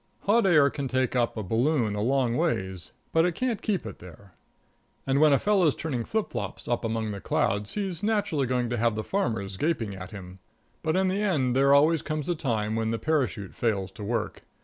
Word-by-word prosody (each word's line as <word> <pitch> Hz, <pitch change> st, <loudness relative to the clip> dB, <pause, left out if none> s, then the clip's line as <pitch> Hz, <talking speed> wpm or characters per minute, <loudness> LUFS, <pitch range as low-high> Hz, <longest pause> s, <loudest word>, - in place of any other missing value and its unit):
Hot 210 Hz, 0 st, +3 dB
air 150 Hz, -6 st, +5 dB
can 140 Hz, -2 st, -3 dB
take 130 Hz, 0 st, 0 dB
up 120 Hz, -2 st, +1 dB
a 110 Hz, -, -2 dB
balloon 115 Hz, -, +1 dB
a 105 Hz, -, -2 dB
long 125 Hz, 0 st, +1 dB
ways, 95 Hz, -, -2 dB, 0.2 s
but 160 Hz, -, +4 dB
it 175 Hz, -1 st, 0 dB
can't 250 Hz, -4 st, -1 dB
keep 195 Hz, -, -1 dB
it 105 Hz, -, -8 dB
there. 90 Hz, +2 st, -14 dB, 0.7 s
And 135 Hz, +1 st, +2 dB
when 155 Hz, -1 st, +6 dB
a 140 Hz, -, +5 dB
fellow's 185 Hz, -4 st, +2 dB
turning 130 Hz, -8 st, -3 dB
flip 220 Hz, -1 st, -2 dB
flops -, -, -5 dB
up 120 Hz, 0 st, -1 dB
among 110 Hz, -1 st, -2 dB
the 100 Hz, -1 st, -6 dB
clouds, 105 Hz, +1 st, -1 dB
he's 190 Hz, -5 st, -2 dB
naturally 205 Hz, -, 0 dB
going 125 Hz, -1 st, 0 dB
to 120 Hz, -, 0 dB
have 115 Hz, -1 st, +1 dB
the 110 Hz, -, -3 dB
farmers 110 Hz, -, -2 dB
gaping 120 Hz, -, -1 dB
at 90 Hz, -1 st, -8 dB
him. 95 Hz, -2 st, -10 dB, 0.4 s
But 160 Hz, -1 st, 0 dB
in 190 Hz, 0 st, +2 dB
the 190 Hz, +2 st, 0 dB
end 140 Hz, -12 st, +1 dB
there 140 Hz, +1 st, +4 dB
always 155 Hz, +3 st, +5 dB
comes 155 Hz, -1 st, -3 dB
a 175 Hz, -, +1 dB
time 110 Hz, -9 st, -1 dB
when 115 Hz, 0 st, 0 dB
the 115 Hz, -, -1 dB
parachute 120 Hz, -, -1 dB
fails 100 Hz, -3 st, -1 dB
to 100 Hz, +2 st, -9 dB
work. 115 Hz, +3 st, -2 dB
130 Hz, 215 wpm, -27 LUFS, 110-160 Hz, 0.7 s, when